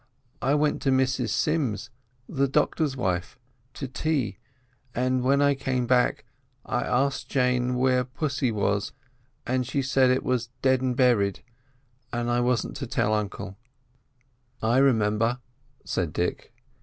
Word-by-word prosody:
I 140 - +2
went 150 0 +1
to 135 - +1
Mrs 130 -2 +1
Sims, 120 - 0 0.4
the 140 0 0
doctor's 145 0 +1
wife, 90 -5 -2 0.4
to 135 - -4
tea; 130 -2 -1 0.6
and 130 +1 +1
when 140 +3 +3
I 145 0 +4
came 130 -2 -1
back 125 0 +2 0.4
I - - -1
asked 135 +3 0
Jane 125 -1 +1
where 125 0 +2
pussy 135 0 -2
was—and 120 +4 -3
she 140 +1 -1
said 130 0 +3
it 130 +1 +2
was 125 -2 -1
deadn' 130 -1 +2
berried, 115 -7 +2 0.7
but 120 0 -2
I 120 0 +1
wasn't 120 -1 0
to - - -5
tell 110 - +1
uncle." 100 -1 -3 1.0
"I 115 +3 +2
remember," 115 -2 +2 0.5
said 85 -4 -2
Dick. 90 - -2
125 Hz, 130 wpm, -26 LUFS, 115-135 Hz, 1.0 s, I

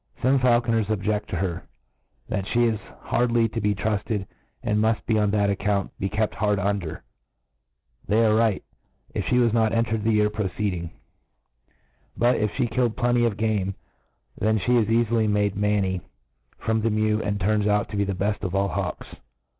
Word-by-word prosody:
Some 135 +2 +4
faulconers 120 -3 +2
objeQ: 105 0 -1
to - - -4
her, 85 -1 -3 0.6
that 95 0 -3
(he 120 +1 +2
is 110 -3 0 0.2
hardly 120 -1 +2
to 115 +1 -3
be 105 0 +1
trufted, 105 0 -2 0.4
and 105 0 +1
muft, 110 +1 +1
on 105 -1 +2
that 100 -1 +2
account, 100 0 -1
be' 95 - -1
kept 105 +1 -1
hard 105 0 +1
under, 100 -4 -2 1.0
'They 115 +2 +3
arc. 110 0 +3
right, 110 -4 +1 0.5
if - - -2
(he 125 - +2
was 120 -3 +3
not 110 -1 +2
entered 115 -2 0
the 115 0 +2
year 105 0 +3
preceeding 95 -4 -2
j - - -15 1.2
but, 120 +2 +3
if 105 0 +1
fhe 120 -2 -1
killed 120 -1 0
plenty 120 -1 +2
bf 115 -4 +1
game, 105 -3 0 0.6
then 110 +1 +2
fhe 120 +5 +2
is 105 - -1
eali 115 0 +2
ly 115 -2 +2
made 105 -1 +1
manny 100 -2 0 0.6
from 110 0 0
the 115 - +1
mew, 110 0 +1
and 100 -1 -2
turns 105 +2 +1
out 105 0 +2
to - - -6
be 100 - +1
the 100 -1 -2
beft 100 +3 -1
of 95 -2 -3
all 100 0 +1
hawks. - - -3
105 Hz, 185 wpm, -24 LUFS, 100-115 Hz, 1.2 s, Some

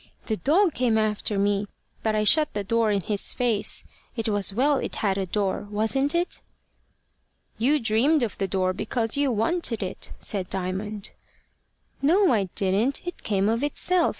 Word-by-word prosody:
The 220 - -1
dog 335 - +3
came 235 -3 +1
after 215 -1 0
me, 200 +1 +1 0.3
but 220 -1 0
I 215 - +2
shut 300 +7 +3
the 205 - -1
door 230 +2 +1
in 200 -1 +1
his 205 +2 -1
face. 235 -5 +1 0.3
It 225 -2 -2
was 205 -2 +1
well 275 +7 +2
it - - -4
had 195 -3 0
a 190 - -2
door 200 +1 -1
wasn't 245 +8 +1
it?" 345 +1 -1 1.2
"You 285 +6 +3
dreamed 250 +6 +3
of 225 - -2
the 195 - 0
door 185 0 0
because 225 +3 -1
you 285 -2 +1
wanted 230 - 0
it," 185 - -6
said 190 -3 -3
Diamond. 195 +3 -4 0.9
"No, 350 +5 +4
I 205 -4 +2
didn't; 205 - 0
it 355 - -6
came 200 -1 0
of 230 +2 +1
itself. 340 +4 +2
220 Hz, 170 wpm, -25 LUFS, 200-275 Hz, 1.2 s, No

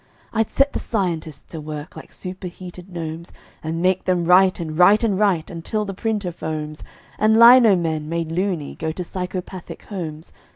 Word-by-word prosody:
I'd 225 -1 +1
set 275 +1 +2
the - - -2
scientists 170 - -3
to 160 - -6
work 150 +1 -7
like - - -11
superheated 180 0 -8
gnomes, 165 -1 -6 0.3
And 165 +2 -3
make 185 0 +2
them 180 -2 +1
write 185 +2 +5
and 160 -2 -4
write 195 +6 +6
and 200 -4 +1
write 190 -7 +1
until 195 +5 -3
the 195 - -5
printer 210 -2 -2
foams 155 -2 -5 0.4
And 220 +1 +4
lino 235 -3 +8
men, 160 -3 -2
made 165 -1 -2
"loony", 175 -4 -2
go 160 0 -3
to 180 +3 -5
psychopathic 180 0 -6
homes. 165 -6 -7
180 Hz, 170 wpm, -22 LUFS, 160-195 Hz, 0.4 s, lino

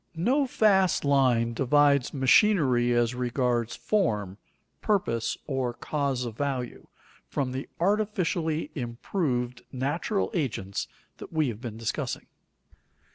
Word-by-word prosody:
No 260 - +2
fast 195 - +3
line 125 -5 +3
divides 140 +2 +3
machinery 135 - +4
as 120 0 +2
regards 125 -1 -1
form, 105 - -1 0.4
purpose, 115 - 0
or 130 -4 -2
cause 140 -4 -2
of 115 -3 -6
value, 130 -2 -3 0.4
from 135 -3 -2
the 130 +2 -5
artificially 180 -5 0
improved 125 -1 -2
natural 145 - -1
agents 115 - -2 0.3
that - - -10
we 155 -4 +1
have 110 -1 -7
been 115 -4 -6
discussing. 115 -1 -3
135 Hz, 110 wpm, -27 LUFS, 120-165 Hz, 0.4 s, machinery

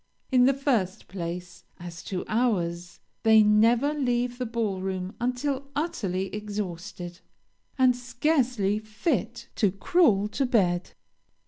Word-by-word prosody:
In 250 -1 +5
the 270 - +5
first 240 -10 -1
place, 180 0 -6 0.2
as 170 -2 -8
to 185 -2 -4
hours 175 -7 -1 0.2
they 220 -1 +6
never 230 +7 +4
leave 245 -3 -1
the 250 - -2
ball 220 -5 -2
room 185 0 -3
until 260 +3 -1
utterly 195 - -2
exhausted, 185 -4 -5 0.6
and 255 -2 +5
scarcely 245 -5 0
fit 230 +2 -2
to 205 -4 +3
crawl 205 - +3
to 270 +4 -1
bed. 185 -8 +1
215 Hz, 120 wpm, -27 LUFS, 185-250 Hz, 0.6 s, they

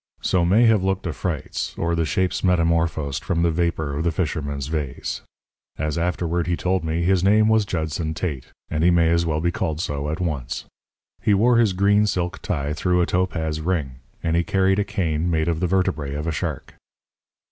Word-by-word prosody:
So 90 -2 +2
may 100 +8 +4
have 110 -4 +4
looked 95 0 -1
afrites 85 -1 -3
or 85 0 0
the 85 -1 +1
shapes 95 +2 0
metamorphosed 85 -5 +1
from 85 0 0
the 85 - +3
vapour 80 -3 -1
of 75 +3 -2
the 85 - +1
fisherman's 75 -4 -2
vase. 75 -3 -3 0.6
As 75 0 -1
he 85 - -1
afterward 85 0 -1
told 90 -1 0
me, 80 +1 -1
his 95 0 +2
name 105 +2 +5
was 110 -1 +3
Judson 80 -1 -2
Tate; 75 -8 -3 0.2
and 80 0 -1
he 85 - +6
may 85 -2 +4
as 85 0 +2
well 75 -1 0
be 85 +1 +1
called 80 -2 -2
so 75 -3 -2
at 80 - -3
once. 75 -9 -3 0.6
He 105 - +3
wore 115 +4 +4
his 110 -5 +3
green 100 +3 +3
silk 90 -2 -2
tie 75 -2 -2
through 90 +3 +1
a 90 - +3
topaz 80 -4 -1
ring; 75 -7 -2 0.3
and 80 0 +1
he 85 - +2
carried 95 +2 +2
a - - +3
cane 90 -5 -1
made 80 -1 +1
of 85 -2 0
the 90 - +1
vertebræ 85 -7 0
of 75 - -4
a 80 - 0
shark. - - -4
85 Hz, 200 wpm, -23 LUFS, 80-95 Hz, 0.6 s, he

